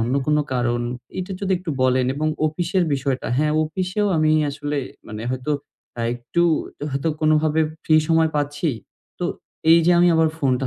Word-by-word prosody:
অন্য 120 +3 0
কোন 150 0 +3 0.2
কারণ, 120 -1 0 0.4
এটা 185 +1 -4
যদি 195 -1 0
একটু 180 -2 -5
বলেন 130 0 +3
এবং 155 +2 -1 0.2
অফিসের 175 +4 0
বিষয়টা। 135 -1 -2
হ্যাঁ? 150 +2 +2
অফিসেও 185 +6 -1
আমি 155 -1 +3 0.2
আসলে 145 +1 -4 0.3
মানে 105 0 -6
হয়তো 130 +3 -2 0.5
আ - - -2
একটু 120 +8 -1 0.5
হয়তো 140 +4 -1
কোনোভাবে 155 0 +3 0.2
ফ্রি 155 - +4
সময় 160 -1 +3
পাচ্ছি। 145 +2 -1 0.5
তো - - -2 0.5
এইযে 165 +1 +6
আমি 175 0 +5
আবার 160 0 +4
ফোনটা 130 -3 +1
150 Hz, 160 wpm, -22 LUFS, 130-165 Hz, 0.5 s, এইযে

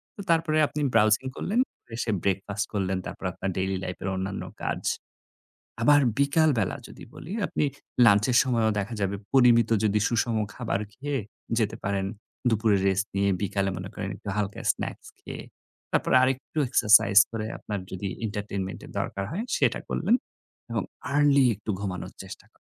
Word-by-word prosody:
তো 200 - -7
তারপরে 165 -1 +2
আপনি 150 - -4
browsing 110 +4 +4
করলেন, 220 +6 0 0.2
পরে 115 - -16
এসে 115 - -1
breakfast 100 +1 -1
করলেন। 95 -2 0
তারপরে 95 - -5
আপনার 100 - -3
daily 95 0 0
life 90 - -5
এর 95 - -1
অন্যান্য 95 +1 -3 0.2
কাজ। - - -2 1.0
আবার 145 +4 +6 0.2
বিকালবেলা 140 - +2
যদি - - -12
বলি, 170 - -9 0.2
আপনি - - -1 0.4
lunch 105 -1 +6
এর 125 - +4
সময়ও 115 -4 +2
দেখা 105 +4 -4
যাবে 100 0 0 0.2
পরিমিত 120 -4 +5 0.2
যদি 105 0 +2
সুষম 115 0 0 0.2
খাবার 115 -5 -2
খেয়ে 140 +2 -3 0.4
যেতে 105 -2 0
পারেন 100 -1 0 0.4
দুপুরে 110 -1 +3
rest 95 +2 +1
নিয়ে, 100 0 +2
বিকালে 100 -1 0
মনে 95 +2 -6
করেন 95 - -4
একটু 100 - -7
হালকা 100 -1 -2
snacks - - -6
খেয়ে। - - -8 0.5
তারপরে - - +2
আরেকটু 135 +4 -1
exercise 105 -3 +6
করে 110 -1 -3
আপনার 105 -2 -4
যদি 95 +1 -4 0.2
entertainment 100 -2 -4
এর - - -12
দরকার 100 - -3
হয়, 205 +7 -2
সেটা - - +2
করলেন 200 +8 +2 0.6
এবং - - 0 0.3
early 140 -2 +5
একটু 105 +2 -11
ঘুমানোর 95 -3 -5
চেষ্টা - - -10
কর - - -32
105 Hz, 160 wpm, -26 LUFS, 100-130 Hz, 1.0 s, আবার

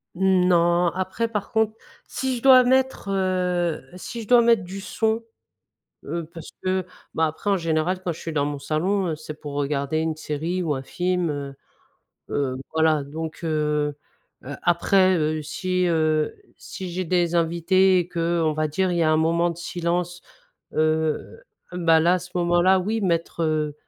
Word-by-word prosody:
Mmh 185 0 +3
non, 175 0 +3
après 190 +6 -2
par 210 -3 -4
contre, 220 -1 +2 0.3
si 265 -1 -2
je 235 - -6
dois 260 -1 +8
mettre, 260 -3 +1
heu 180 -3 0
si 230 +5 -7
je - - -13
dois 245 0 +6
mettre 230 -4 +3
du 190 +2 -7
son, 220 +3 -1 0.8
heu, 170 -2 -4
parce 165 -2 -9
que, 185 -1 0 0.3
bah, 160 0 +2
après 160 +6 -3
en 195 - +3
général 165 +2 -1
quand 180 -2 -2
je 160 - -12
suis 165 - -5
dans 145 -2 +1
mon 145 0 -3
salon, 175 +7 -1
heu, 160 - -2
c'est 155 0 -9
pour 145 -2 -7
regarder 140 +1 -1
une 160 0 -1
série 160 +4 -3
ou 155 -3 0
un 135 - -3
film, 180 +4 -1
heu, 140 -2 -5 0.7
hem, 130 -2 -1 0.2
voilà. 160 -2 +3
Donc, 155 +3 -6
heu 150 -2 0 0.5
heu, 140 +2 -6
après, 185 +2 +3
heu, 155 -1 0
si, 180 +4 -1
heu, 155 -2 +1 0.2
si 185 -2 -7
j'ai 185 +2 -2
des 175 0 +1
invités 175 +3 +3
et 175 - -3
que 170 -1 0
on 155 - +2
va 155 0 -1
dire 185 +5 0
il 175 - -1
y - - +3
a 155 - +3
un 155 - +3
moment 165 +2 +2
de 170 - -4
silence, 175 +1 -2 0.5
heu, 155 - 0 0.3
bah, 165 -2 +3
là, 170 +3 +4
à - - +1
ce 180 0 -11
moment-là 175 +2 +3
oui, 215 +5 -1
mettre, 170 -3 -1
heu 155 -2 0
170 Hz, 185 wpm, -23 LUFS, 155-185 Hz, 0.8 s, dois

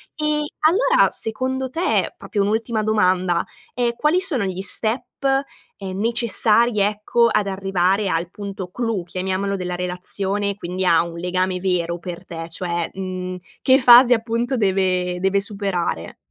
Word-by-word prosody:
Ehm, 300 0 0 0.2
allora, 430 +11 +4
secondo 260 +3 -2
te, 340 +7 0
proprio 205 -2 -2
un'ultima 220 +2 -1
domanda, 185 -5 +1 0.3
ehm, 240 -1 0
quali 305 +7 +2
sono 310 - +2
gli 190 0 -4
step, 220 +5 +1 0.8
ehm, 190 -1 -6
necessari, 230 0 +3
ecco, 210 +3 +2
ad 210 -1 +1
arrivare 195 0 0
al 170 0 -1
punto 195 -2 -7
clou, 225 -2 -2
chiamiamolo, 185 +3 -2
della 180 -2 -4
relazione 195 +3 -3
quindi 185 0 -4
a 165 -2 +4
un 170 0 -8
legame 180 +1 -1
vero 175 -2 -1
per 175 +1 -8
te? 165 -1 -7
Cioè, 170 0 -3
mhmm, 185 -1 -5 0.3
che 260 0 +5
fase 245 0 +8
appunto 235 +2 -1
deve 185 -3 0
deve 190 +2 +1
superare? 195 - -3
195 Hz, 140 wpm, -21 LUFS, 180-230 Hz, 0.8 s, fase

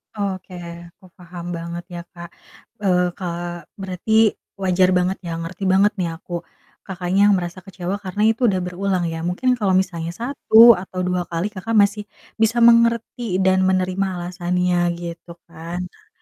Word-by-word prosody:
Oke, 190 -2 -4 0.3
aku 180 +2 -21
paham 175 -1 -10
banget 170 +1 -6
ya, - - -5
Kak. 170 -1 -10 0.5
Eee, 180 -2 +2
Kak, 175 -2 -5 0.2
berarti 185 +2 -5 0.5
wajar 185 0 +3
banget 180 +1 0
ya, - - -4
ngerti 180 +4 -7
banget 200 +2 +4
nih 170 -2 0
aku, 175 +1 -11 0.5
Kakaknya 185 0 -1
yang 205 - +5
merasa 175 0 -4
kecewa 185 +2 -4
karena 205 +1 -3
itu 240 +2 +1
udah 185 -4 0
berulang 180 0 -1
ya, 165 - -5
mungkin 235 +9 0
kalau 195 -3 +2
misalnya 180 -3 0
1 235 -3 +6
atau 185 -1 -7
2 180 -1 -1
kali, 175 +5 -3
Kakak 225 +3 -4
masih 205 0 +3 0.3
bisa 225 +2 +2
mengerti 235 -2 +3
dan 190 0 +3
menerima 185 +1 +1
alasannya 180 0 -1 0.2
gitu 170 0 -8 0.2
kan. 170 +3 -6
Nah, 180 - -14
185 Hz, 155 wpm, -21 LUFS, 175-200 Hz, 0.5 s, 1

